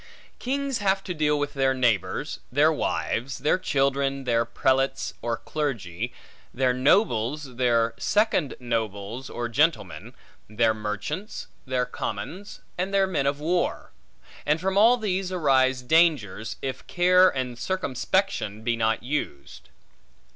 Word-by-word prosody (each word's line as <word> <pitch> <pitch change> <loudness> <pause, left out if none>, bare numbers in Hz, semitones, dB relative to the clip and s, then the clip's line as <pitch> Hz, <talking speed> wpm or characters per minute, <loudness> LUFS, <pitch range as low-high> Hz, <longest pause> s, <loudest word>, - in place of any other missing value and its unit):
Kings 275 0 -2
have 195 -1 +1
to 180 - -4
deal 150 -2 +1
with 145 0 -2
their 135 -2 +1
neighbors, 120 -6 0
their - - +4
wives, 130 +4 -2
their 155 - +1
children, 140 -4 0
their 115 -2 +1
prelates 135 +3 0
or 115 -1 -2
clergy, 115 - -3 0.4
their 130 0 +1
nobles, 135 - +1
their 115 -2 +2
second 205 - +1
nobles 115 0 -3
or 120 0 -3
gentlemen, 150 +8 0 0.3
their 110 +1 +2
merchants, 110 - -5 0.2
their 130 -1 0
commons, 125 - -6 0.2
and 185 +2 -1
their 195 -1 +3
men 150 -8 -1
of 140 +1 0
war; 175 +4 -1 0.5
and 150 +2 +1
from 190 +2 -1
all 230 +5 +6
these 190 -4 -2
arise 130 -7 +2
dangers, 125 - +2
if 130 -2 -5
care 180 +1 +5
and 125 -4 -4
circumspection 130 - -1
be 120 +1 +1
not 110 -1 0
used. 125 - -5
135 Hz, 130 wpm, -25 LUFS, 120-175 Hz, 0.5 s, all